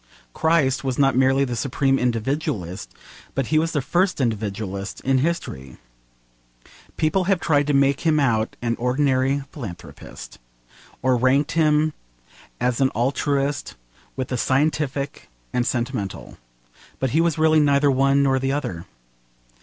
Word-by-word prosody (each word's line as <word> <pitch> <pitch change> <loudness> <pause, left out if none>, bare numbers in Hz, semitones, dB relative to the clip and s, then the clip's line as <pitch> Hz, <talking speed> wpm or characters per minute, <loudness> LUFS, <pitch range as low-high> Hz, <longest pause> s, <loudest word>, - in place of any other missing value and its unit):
Christ 150 -4 +2
was 130 -2 -2
not 135 -2 +3
merely 135 +1 +3
the 125 -2 -3
supreme 135 +2 +1
individualist, 115 - -2 0.4
but 135 - 0
he 155 - +5
was 165 +1 0
the 145 -4 0
first 175 +6 +1
individualist 100 -4 -3
in 135 0 +2
history. 75 - -3 1.2
People 170 +4 +1
have 195 -1 +2
tried 145 -4 +1
to 145 - +1
make 140 0 +3
him 160 -2 +2
out 115 -5 +1
an 115 -1 0
ordinary 135 +2 +1
philanthropist, 95 - -10 0.6
or 130 -1 +3
ranked 130 +4 +2
him 155 -1 +2 0.7
as 125 +1 0
an 135 - +4
altruist 140 - -1 0.4
with 130 -1 -4
the 125 - -2
scientific 140 - -1 0.2
and 125 -1 0
sentimental. 120 -5 -4 0.6
But 130 -2 -1
he 160 - +3
was 170 -2 +1
really 155 0 +4
neither 145 -1 +3
one 135 +1 +3
nor 135 -1 +2
the 135 +1 -1
other. 90 - -4
135 Hz, 140 wpm, -22 LUFS, 125-150 Hz, 1.2 s, he